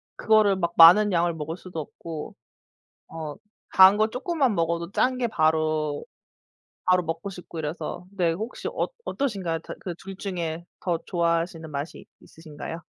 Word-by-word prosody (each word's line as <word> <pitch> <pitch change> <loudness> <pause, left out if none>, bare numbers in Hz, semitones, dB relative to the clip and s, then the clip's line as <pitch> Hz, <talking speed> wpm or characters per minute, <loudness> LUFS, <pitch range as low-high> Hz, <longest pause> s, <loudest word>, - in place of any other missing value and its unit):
그거를 215 -3 +4
막 170 -2 -1
많은 195 +5 +9
양을 170 -1 +2
먹을 160 +2 -5
수도 180 -3 -7
없고 155 +1 -7 0.7
어 155 -3 -6 0.4
단 190 +2 +9
거 215 0 +3
쪼끔만 265 - 0
먹어도 170 +2 -1
짠게 250 -1 +1
바로 155 -4 +1 0.8
바로 180 -1 +4
먹고 165 +4 -4
싶고 175 -3 -8
이래서 165 +3 -5
네. 175 -4 +1
혹시 220 +8 -6
어 - - -1 0.2
어떠신가요? 195 - -2
다 - - -8
그 175 -3 -5
둘 195 +2 -10
중에 170 -4 -4 0.2
더 175 -3 0
좋아하시는 170 -1 -1
맛이 145 +2 -5 0.2
있으신가요? 160 +1 -9
170 Hz, 290 characters per minute, -25 LUFS, 160-195 Hz, 0.8 s, 많은